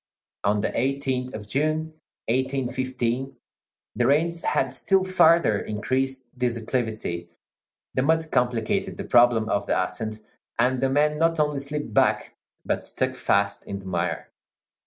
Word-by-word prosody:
On 105 +1 +2
the - - 0
18th 130 -1 -1
of 105 -1 -7
June, 155 +5 -1 0.3
1815, 130 0 -1 0.6
the 120 +2 +2
rains 165 +4 +2
had 130 -1 0
still 190 +8 +2
farther 170 - +4
increased 130 +4 -2
this 120 -2 +1
acclivity, 110 -7 -3 0.6
the 130 - +1
mud 160 +3 +1
complicated 120 -3 0
the - - -4
problem 120 -2 +4
of 100 -2 -1
the - - +2
ascent, 110 +3 -3 0.4
and 125 +2 +2
the 135 - +2
men 150 +2 +2
not 165 0 +2
only 150 -2 +1
slipped 140 -4 -5
back, - - +2 0.3
but - - -1
stuck - - -1
fast 100 0 0
in 100 - -4
the 95 - -11
mire. 90 -1 -2
130 Hz, 140 wpm, -25 LUFS, 110-145 Hz, 0.6 s, farther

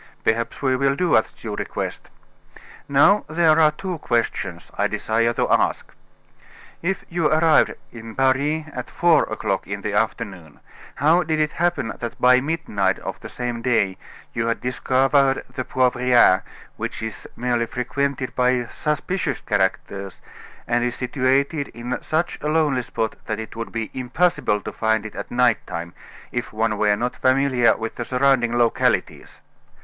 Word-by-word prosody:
"Perhaps 115 +5 -1
we 130 -1 +3
will 135 +1 +2
do 175 +3 +2
as 110 - +2
you 105 -2 -4
request. - - -5 0.8
Now, 145 +9 +5
there 160 0 +4
are 155 -1 +6
two 175 +2 -5
questions 105 - -2
I - - +1
desire 115 +1 0
to - - 0
ask. - - +1 0.9
If 190 +2 -2
you 170 -2 0
arrived 155 +1 +4 0.2
in 115 -1 -10
Paris 140 +4 +1
at - - -6
four 170 -2 +3
o'clock 95 -1 -2
in 100 +1 -4
the 105 0 -3
afternoon, 95 -7 -2 0.4
how 160 +6 +4
did 155 -2 -1
it 155 0 +1
happen 170 -10 -1
that 120 -1 -6
by 125 0 +5
midnight 140 -11 0
of - - -6
the - - -9
same 120 -1 -4
day 115 -6 +1 0.4
you 115 0 -1
had 115 - 0
discovered 135 +2 +2
the 130 - -3
Poivriere, 125 -6 +4 0.4
which - - -5
is 110 -1 -6
merely 120 -1 0
frequented 130 +1 -2
by 125 -1 +2
suspicious 150 +3 -2
characters, 100 -1 -2 0.5
and 120 0 +1
is 120 0 -1
situated 135 +3 0
in 120 +2 -4
such 160 +3 -1
a 150 - -2
lonely 150 -5 +2
spot 110 -2 -3
that 110 - -2
it 110 - -7
would 115 0 -5
be 115 -1 -4
impossible 130 -4 0
to - - -6
find 110 -1 0
it 105 - -7
at 100 - -6
night 125 -2 +2
time, 85 +1 -5 0.4
if 120 -1 -3
one 110 -1 -1
were 105 -1 +3
not 120 +4 -2
familiar 130 -2 +3
with 115 0 -4
the 120 - -2
surrounding 125 -2 +2
localities? 120 -1 0
125 Hz, 155 wpm, -22 LUFS, 115-140 Hz, 0.9 s, are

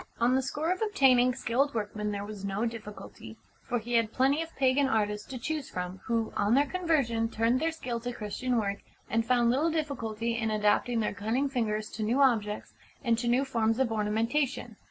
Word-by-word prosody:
On 240 +2 +3
the 265 - +3
score 295 +5 -2
of 370 - -2
obtaining 260 - +4
skilled 265 +2 0
workmen 210 -1 -2
there 200 0 -4
was 205 -1 -8
no 200 +3 -1
difficulty, 225 -3 -8 0.3
for 245 - +1
he 240 +1 -5
had 230 -2 +2
plenty 270 +6 +2
of 325 - -5
pagan 270 +1 +3
artists 210 -3 0
to 265 - -6
choose 300 +3 -3
from, 180 +1 -5
who, 230 -1 -1
on 205 +4 +2
their 285 +2 +4
conversion, 275 -9 0
turned 230 +3 +1
their 325 +2 0
skill 250 -7 -4
to 245 +1 -4
Christian 240 +3 -2
work, 200 -2 -1 0.3
and 225 +1 +2
found 240 0 +3
little 290 +6 +2
difficulty 235 -8 -2
in 220 -1 -1
adapting 215 +2 +2
their 210 - -1
cunning 225 +6 -1
fingers 215 -5 -1
to 220 - -6
new 230 +5 +1
objects 215 -6 +1 0.3
and 235 -3 +3
to 240 - -2
new 250 +3 +3
forms 225 -4 +1
of 260 -3 +1
ornamentation. 225 +3 -1
235 Hz, 195 wpm, -29 LUFS, 215-265 Hz, 0.3 s, obtaining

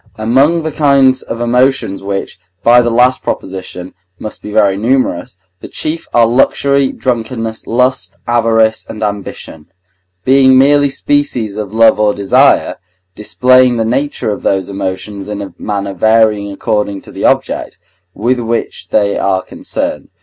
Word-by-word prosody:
Among 135 +9 +2
the 160 - -3
kinds 140 -3 +3
of 115 - -6
emotions, 125 -3 +1
which, 100 -1 -5 0.2
by 120 +1 +6
the 120 - 0
last 125 +2 +2
proposition, 95 -1 -6 0.2
must 105 - -7
be 105 - -8
very 105 -2 +3
numerous, 110 -5 -1 0.2
the - - -9
chief 155 +2 -4
are 120 -1 +4
luxury, 135 +3 +2
drunkenness, 115 -2 -4
lust, 115 -6 0
avarice, 115 -2 +1
and 110 0 -6
ambition, 100 -6 -6 0.6
being 130 0 +5
merely 145 +1 +4
species 135 -7 -1
of 105 -2 -5
love 110 -1 +4
or 105 -1 +2
desire, 100 -1 +2 0.4
displaying 125 +4 +2
the 115 - 0
nature 130 0 -1
of 105 - -5
those 95 -1 -1
emotions 100 +1 -5
in 105 -1 -5
a 100 -1 -7
manner 100 -1 -3
varying 110 0 +2
according 100 0 -2
to - - -14
the - - -4
object, - - 0 0.4
with 125 +4 0
which 115 0 -3
they 100 -1 +1
are 95 -1 0
concerned. - - -5
115 Hz, 145 wpm, -13 LUFS, 100-130 Hz, 0.6 s, by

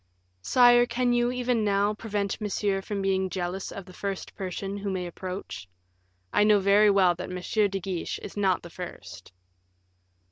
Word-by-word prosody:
"Sire, 245 - +5
can 245 0 +1
you, 240 0 +2
even 250 -2 0
now, 205 0 +2
prevent 205 -1 -3
Monsieur 200 -1 -1
from 200 0 -4
being 190 -1 +1
jealous 180 +1 -4
of 195 - -8
the 185 - -14
first 195 0 -5
person 195 +1 -5
who 200 0 -4
may 185 -2 -2
approach? 180 - -7 0.6
I - - +4
know 210 0 +5
very 200 +2 +5
well 190 -3 +4
that 180 +2 -7
M. 190 +3 0
de 195 0 -3
Guiche 185 -2 -4
is - - -8
not 195 -3 +1
the 170 - -10
first." 95 - -9
195 Hz, 170 wpm, -27 LUFS, 185-210 Hz, 0.6 s, Sire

